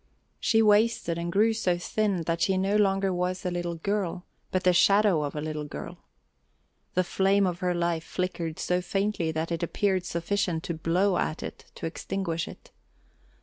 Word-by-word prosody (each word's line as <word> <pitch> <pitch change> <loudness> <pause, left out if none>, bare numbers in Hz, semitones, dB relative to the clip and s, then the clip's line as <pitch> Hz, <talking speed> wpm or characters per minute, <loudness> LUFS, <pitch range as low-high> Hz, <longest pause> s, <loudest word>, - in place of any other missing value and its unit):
She 225 -2 +3
wasted 210 -5 +3
and 170 0 -3
grew 215 +5 +3
so 185 -6 0
thin 195 0 -1
that 165 +1 -1
she 190 -1 +2
no 195 +2 +1
longer 195 -2 +2
was 180 +1 -2
a 180 - 0
little 175 -1 -2
girl, 185 0 -2 0.2
but 185 -1 -1
the 180 - +5
shadow 200 -2 +4
of 145 0 -3
a 150 - -2
little 155 0 -3
girl. 70 - -8 1.0
The 185 - +3
flame 195 +2 +2
of 180 -1 -2
her 180 -1 0
life 170 -1 0
flickered 170 -3 -3
so 180 0 0
faintly 195 -2 -1
that 160 +1 -3
it 165 - -2
appeared 185 +1 0
sufficient 170 -1 -1
to 170 - -3
blow 175 +4 +1
at 155 - -2
it - - -8
to - - -6
extinguish 165 0 -3
it. - - -12
180 Hz, 180 wpm, -27 LUFS, 170-195 Hz, 1.0 s, the